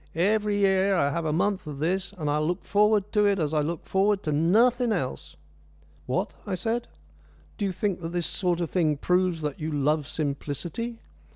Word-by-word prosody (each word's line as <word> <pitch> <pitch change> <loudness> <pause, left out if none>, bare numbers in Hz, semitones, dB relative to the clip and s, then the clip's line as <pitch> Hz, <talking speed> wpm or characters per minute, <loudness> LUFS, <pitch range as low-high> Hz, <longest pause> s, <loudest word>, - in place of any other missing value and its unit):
Every 205 +4 +2
year 195 0 +3
I 140 -5 +2
have 170 +1 -2
a 155 - 0
month 185 +2 0
of 145 -2 -6
this, 185 +6 -1
and 155 -3 -3
I 145 +1 +1
look 165 +3 -2
forward 210 0 +2
to 210 -1 +3
it 200 -1 +2
as 155 -3 -1
I 155 - +2
look 160 +2 -3
forward 195 +1 +1
to 155 - -1
nothing 225 - +3
else." 130 - -3 0.7
"What?" 185 - -1
I 195 - -1
said. 230 +5 -2 0.7
"Do 205 - 0
you 195 - 0
think 185 0 -2
that 165 - -4
this 175 -1 -1
sort 180 -2 0
of 170 - -3
thing 155 -5 +1
proves 180 0 +1
that 150 -2 -3
you 155 0 -3
love 150 0 +1
simplicity? 155 - -3
180 Hz, 195 wpm, -26 LUFS, 155-205 Hz, 0.7 s, year